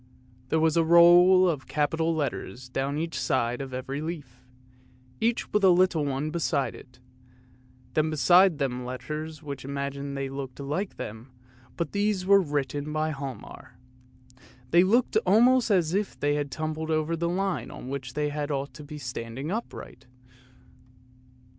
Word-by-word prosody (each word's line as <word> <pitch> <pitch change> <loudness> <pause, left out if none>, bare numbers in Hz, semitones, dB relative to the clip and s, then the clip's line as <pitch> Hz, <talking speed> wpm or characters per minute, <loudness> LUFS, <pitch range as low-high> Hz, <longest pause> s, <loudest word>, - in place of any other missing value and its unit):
There 160 - +2
was 160 0 +2
a 165 - +4
row 175 +3 +7
of 155 -7 -1
capital 160 +2 0
letters 130 -4 -4
down 135 +3 -2
each 165 +1 -3
side 120 0 0
on 135 -1 -6
every 135 +3 -4
leaf, 145 -7 -7 0.8
each 230 +1 -1
with 210 - +2
a 190 - +7
little 180 -3 +3
one 140 +2 -2
beside 155 -4 -1
it; 125 -2 -15 1.0
then 155 0 +1
beside 175 +3 +5
them 125 -3 -2
letters 155 +5 -6
which 140 -3 -6
imagined 140 0 -4
that - - -3
they 135 - -3
looked 135 -1 -7
like 150 +8 -3
them, 110 +4 -7 0.5
but 170 -3 -2
these 205 -2 0
were 200 +1 +6
written 145 -2 -2
by 155 +1 -1
Hialmar. 135 -3 -8 0.9
They 170 +1 +6
looked 235 - +2
almost 245 - +4
as 175 -5 +2
if 200 +1 -2
they 145 0 +1
had 145 -1 -2
tumbled 155 +1 -4
over 155 +1 0
the 170 +1 -1
line 180 -9 -2
on - - -9
which 130 -2 -5
they 150 0 -1
ought 145 -2 -3
to - - -11
have 145 - -12
been 150 0 -8
standing 125 +2 -5
upright. 190 - -6
150 Hz, 160 wpm, -27 LUFS, 135-170 Hz, 1.0 s, row